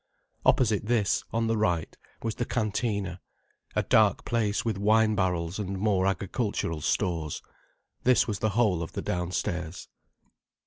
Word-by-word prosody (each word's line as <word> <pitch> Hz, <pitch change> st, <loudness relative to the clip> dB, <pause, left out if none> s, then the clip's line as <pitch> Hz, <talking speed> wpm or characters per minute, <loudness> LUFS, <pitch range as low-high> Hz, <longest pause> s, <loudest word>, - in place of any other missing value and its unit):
Opposite 105 Hz, -4 st, +3 dB
this, 110 Hz, -4 st, +2 dB
on 115 Hz, 0 st, 0 dB
the 115 Hz, 0 st, +1 dB
right, 90 Hz, -7 st, 0 dB, 0.3 s
was 115 Hz, -1 st, -1 dB
the 120 Hz, -, -2 dB
cantina, 105 Hz, -5 st, -1 dB, 0.5 s
a -, -, +2 dB
dark -, -, +3 dB
place 110 Hz, -3 st, 0 dB
with 110 Hz, -4 st, -1 dB
wine 110 Hz, +1 st, +4 dB
barrels 90 Hz, -2 st, -1 dB
and 100 Hz, -1 st, -3 dB
more 95 Hz, -2 st, +2 dB
agricultural 95 Hz, -3 st, -2 dB
stores. 80 Hz, -2 st, -1 dB, 0.6 s
This 125 Hz, 0 st, +4 dB
was 105 Hz, -4 st, -2 dB
the 110 Hz, -, +1 dB
whole 100 Hz, -8 st, +3 dB
of 80 Hz, -, -6 dB
the -, -, -4 dB
downstairs. 90 Hz, -1 st, -3 dB
100 Hz, 140 wpm, -28 LUFS, 90-110 Hz, 0.6 s, wine